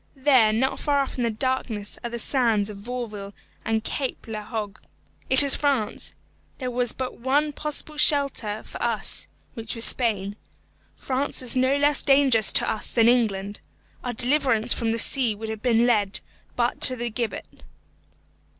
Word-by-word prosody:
There, 260 -5 +3
not 255 +5 -1
far 285 -2 0
off 270 - -5
in - - 0
the 235 - 0
darkness, 225 -3 -3
are 240 - -4
the 235 - -6
sands 225 -4 0
of 205 - -11
Vauville 210 -3 -7 0.3
and 220 -1 -2
Cape 270 +2 -5
la 215 -1 -6
Hogue. 210 -1 -6 0.5
It 260 +2 +9
is 280 - +5
France. 275 -7 -2 0.4
There 255 -2 -5
was 245 -1 -1
but 260 -1 -7
one 290 +4 0
possible 300 +1 -4
shelter 275 -8 +1
for - - -11
us, - - +2 0.3
which 225 -2 -7
was 230 - +2
Spain. 205 -4 +4 0.6
France 265 0 -3
is 250 +1 -1
no 260 +2 +1
less 290 0 +1
dangerous 270 -6 +4
to - - +2
us 215 - -1
than 230 -1 +2
England. 205 -5 0 0.4
Our 245 - -4
deliverance 245 -2 +1
from 230 -1 -2
the 230 - -2
sea 240 -2 0
would 220 +1 -8
have 220 -1 -7
led 230 -4 +1 0.3
but - - -2
to 255 - +8
the 240 -1 -5
gibbet. 235 0 -6
240 Hz, 165 wpm, -23 LUFS, 220-265 Hz, 0.6 s, It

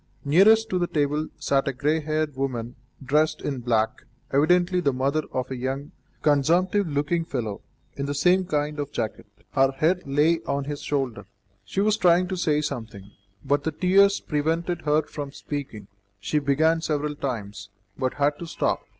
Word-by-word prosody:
Nearest 210 +9 +5
to 185 - +1
the 175 - 0
table 150 0 0
sat 135 0 +1
a 140 - 0
grey 150 +5 +1
haired 155 -1 -2
woman 125 -3 -3 0.3
dressed 150 +4 +2
in 140 -3 -3
black, 115 0 0 0.3
evidently 175 +5 +3
the 145 -6 +2
mother 135 +4 0
of 130 0 -3
a - - -2
young, 135 +3 -4 0.3
consumptive 170 +7 +3
looking 150 +3 0
fellow, 120 -10 -4 0.3
in 140 0 -4
the 145 - -2
same 180 +5 +3
kind 150 -2 -2
of 145 0 -3
jacket. 110 -3 -4 0.2
Her 135 -1 +3
head 165 +7 +1
lay 150 +4 +3
on 140 0 -1
his 145 +1 -5
shoulder. 130 -8 -2 0.4
She 105 - -2
was 215 +1 +2
trying 180 0 +4
to 190 - -2
say 155 -4 +1
something, 110 -9 -6 0.3
but 140 +1 +1
the 160 - -1
tears 195 +3 +4
prevented 165 +3 -1
her 150 +1 +3
from 145 -2 -7
speaking; 135 -9 -6 0.3
she 150 +10 0
began 160 +4 +2
several 150 -2 -1
times, 105 -8 -5 0.3
but 130 +2 -2
had 145 +1 +1
to 170 - -6
stop. - - -1
145 Hz, 170 wpm, -25 LUFS, 135-165 Hz, 0.4 s, Nearest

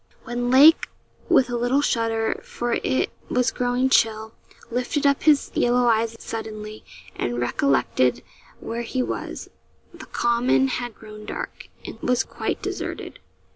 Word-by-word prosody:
When 245 0 -2
Lake, 285 +6 +7 0.4
with 255 - +5
a - - -1
little 245 +4 +2
shudder, 225 -3 0
for 240 0 -3
it 260 - 0 0.2
was 250 -1 +1
growing 250 +1 0
chill, 220 -3 +2 0.4
lifted 250 +5 -1
up 280 -1 +3
his 300 -2 +3
yellow 245 0 +2
eyes 230 -1 +2
suddenly, 215 -1 -7 0.3
and 120 0 -2
recollected 125 0 +1 0.4
where 230 +1 -4
he 250 +2 -2
was, - - -5 0.4
the - - -11
common 240 +3 +2
had 245 -2 -4
grown 215 -1 -12
dark, - - -6 0.2
and - - -8
was 250 +1 +1
quite - - -4
deserted. - - -5
240 Hz, 135 wpm, -23 LUFS, 220-250 Hz, 0.4 s, Lake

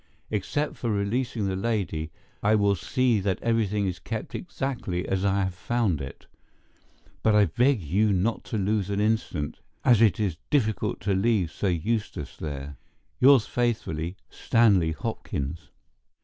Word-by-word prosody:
Except 130 +8 -1
for 120 - -2
releasing 110 +2 -1
the 95 -1 -1
lady 95 -7 -1 0.3
I 105 +2 +4
will 100 -1 +3
see 110 +7 +1
that 95 -1 -1
everything 105 -3 +1
is 90 -2 -3
kept 110 -1 -5
exactly 120 - -3
as 95 0 0
I 100 0 +2
have 95 -1 -2
found 100 - 0
it, 65 - -8 1.0
but 110 -1 +3
I 105 -1 +6
beg 120 - +2
you 100 +7 +2
not 100 +5 0
to 110 - -3
lose 100 0 0
an 100 0 -1
instant, 105 -9 -1 0.3
as 120 -3 +6
it 110 -3 +4
is 95 -7 0
difficult 110 -8 0
to 100 +1 0
leave 95 -4 +2
Sir 95 +5 -1
Eustace 105 +6 -2
there. 70 -2 -6 0.4
Yours 130 -3 +6
faithfully, 95 -8 -1
STANLEY 100 -8 +3
HOPKINS. 85 - -4
100 Hz, 150 wpm, -26 LUFS, 90-115 Hz, 1.0 s, I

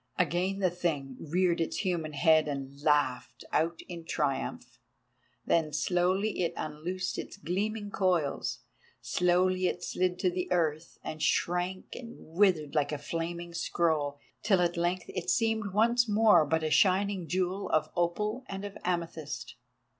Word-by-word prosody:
Again 180 +3 +1
the 185 -3 +1
Thing 150 -7 -2
reared 170 +2 +1
its 165 - -1
human 165 -4 -1
head 155 +1 +4
and 140 -1 -5
laughed 145 -5 +1
out 165 +1 +1
in 170 -2 -7
triumph. 145 -4 -2 0.7
Then 160 -2 +2
slowly 185 +6 +1
it 170 - 0
unloosed 175 +5 -3
its - - -7
gleaming 205 +5 -2
coils: 175 -9 0 0.4
slowly 180 +1 +2
it 180 - -3
slid 180 0 0
to 180 -1 +1
the 180 0 -3
earth 160 -2 0
and 155 0 -6
shrank 180 +2 0
and 235 -1 -8
withered 165 -4 +1
like 150 -2 +1
a 150 - -2
flaming 170 +3 -4
scroll, 155 -4 0 0.2
till 195 -4 +3
at 175 0 +1
length 175 +1 0
it 180 0 -4
seemed 220 -3 +1
once 235 +3 +3
more 210 -7 +5
but 160 +2 +1
a 155 - -1
shining 190 -1 +3
jewel 185 +2 -1
of 155 - +1
opal 210 +8 0
and 195 +1 -5
of 200 - -7
amethyst. 170 -4 -3
175 Hz, 145 wpm, -30 LUFS, 155-185 Hz, 0.7 s, more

